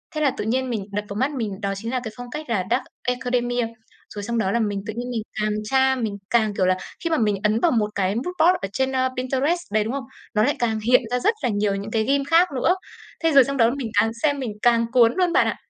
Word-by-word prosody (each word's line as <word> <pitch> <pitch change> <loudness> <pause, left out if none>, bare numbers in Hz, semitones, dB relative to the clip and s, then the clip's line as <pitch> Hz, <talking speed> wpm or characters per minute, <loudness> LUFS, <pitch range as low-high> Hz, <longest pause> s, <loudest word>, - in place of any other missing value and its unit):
Thế 305 - -1
là 285 - +3
tự - - -2
nhiên 255 +3 0
mình 215 -5 -3
đập 205 +1 -3
vào 200 - -5
mắt 265 +7 0
mình 220 -8 -4
đó 200 -1 -1
chính 225 +4 -5
là 255 - 0
cái 220 - -5
phong 245 0 -8
cách 300 -1 -6
là 200 -6 0
Dark - - +2 0.2
Academia. 245 -1 0 0.5
Rồi 205 - -6
xong 235 +3 -2
đó 195 -4 +1
là 235 - +1
mình 205 -3 -1
tự 215 - -4
nhiên 245 +1 -4
mình 230 -3 -2 0.2
càng 210 0 +1
tra, 265 +4 +3
mình 220 -5 -3
càng 220 -3 +2
kiểu 190 - +2
là, 185 0 +2 0.3
khi 335 - 0
mà 320 - +2
mình 210 -3 +2
ấn 215 +1 +2
vào 335 - +3
một 215 -4 +1
cái 195 0 0
mood 235 - -2
board 345 +3 +5
ở 195 - -2
trên, 265 0 0
ơ, 260 0 +1
Pinterest 265 +7 0
đấy, 215 0 +2
đúng 225 +4 -3
không? 275 -1 -3 0.3
Nó 215 - +4
lại 285 +5 +2
càng 225 -2 0
hiện 245 +4 +4
ra 250 - +1
rất 430 - +2
là - - +2
nhiều 205 -1 0
những 200 +2 -5
cái 220 -1 +1
theme 275 +4 +1
khác 330 +5 +4
nữa. 325 +8 +2 0.5
Thế 325 - +3
rồi 275 -3 +8
xong 275 +2 -3
đó 230 -2 +5
mình 265 -4 -3
càng 225 - +3
xem 290 -2 +2
mình 250 -5 -3
càng 235 -1 +4
cuốn 235 -2 +5
luôn 360 -2 +2
bạn 380 - +4
ạ. - - -1
240 Hz, 285 wpm, -23 LUFS, 215-265 Hz, 0.5 s, rồi